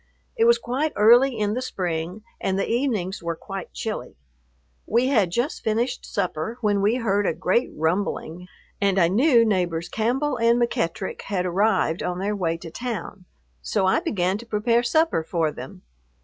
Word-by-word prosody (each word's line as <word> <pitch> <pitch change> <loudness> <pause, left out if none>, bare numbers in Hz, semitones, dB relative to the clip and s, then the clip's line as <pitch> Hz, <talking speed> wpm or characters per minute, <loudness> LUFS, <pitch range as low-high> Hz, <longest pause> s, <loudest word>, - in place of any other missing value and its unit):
It 455 -1 +3
was 470 0 +6
quite 275 +6 -2
early 240 +4 +5
in 210 -1 0
the 250 - -2
spring 180 -3 -3 0.2
and 190 0 -1
the 195 - -1
evenings 225 -7 -1
were 170 0 -3
quite 195 +2 -7
chilly. 215 - -5 0.7
We 240 +4 +2
had 215 -10 +3
just 240 - -2
finished 230 +3 -1
supper, 180 +6 -2
when 205 -2 +1
we 210 +4 +3
heard 205 -5 +1
a - - 0
great 190 +8 +1
rumbling, 170 +1 -2 0.3
and 195 -1 +2
I 170 -3 +4
knew 235 - +4
neighbors 175 -5 0
Campbell 250 +7 0
and 235 +1 +3
McEttrick 190 -6 -2
had 185 -3 -2
arrived 185 -2 +1
on 180 0 -2
their 200 +3 -1
way 165 -4 -1
to 165 -1 -10
town; 210 -4 -5 0.4
so 190 - 0
I 190 - +3
began 195 - -1
to 235 - -10
prepare 230 +2 +2
supper 315 - +2
for 160 -1 0
them. 125 -9 -10
205 Hz, 170 wpm, -24 LUFS, 180-235 Hz, 0.7 s, was